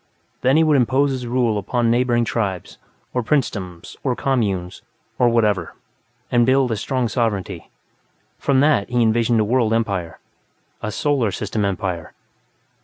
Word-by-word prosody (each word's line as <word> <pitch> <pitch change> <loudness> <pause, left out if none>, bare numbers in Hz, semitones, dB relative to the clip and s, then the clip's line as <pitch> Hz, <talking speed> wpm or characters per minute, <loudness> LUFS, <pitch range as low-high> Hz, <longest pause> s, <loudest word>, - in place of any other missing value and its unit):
Then 130 +4 +3
he 160 - +5
would 155 -2 +4
impose 135 +3 +2
his 125 -2 -4
rule 120 -3 +1
upon 115 +4 0
neighboring 120 -1 +2
tribes, 100 -6 -3 0.3
or 125 - 0
princedoms, 105 - -2
or 130 -3 0
communes, 100 -10 -1 0.4
or 120 - +5
whatever, 105 -7 +1 0.6
and 120 -2 +4
build 130 0 +3
a - - +1
strong 125 +3 -1
sovereignty; 110 -5 -2 0.7
from 135 -2 +2
that 140 -9 +2
he 120 -1 +2
envisioned 115 +1 +2
a - - +3
world 115 -1 +1
empire, 95 -8 -2 0.6
a 105 - -3
Solar 135 -1 +1
System 105 +2 -3
empire. 90 -4 -3
115 Hz, 145 wpm, -21 LUFS, 100-130 Hz, 0.7 s, he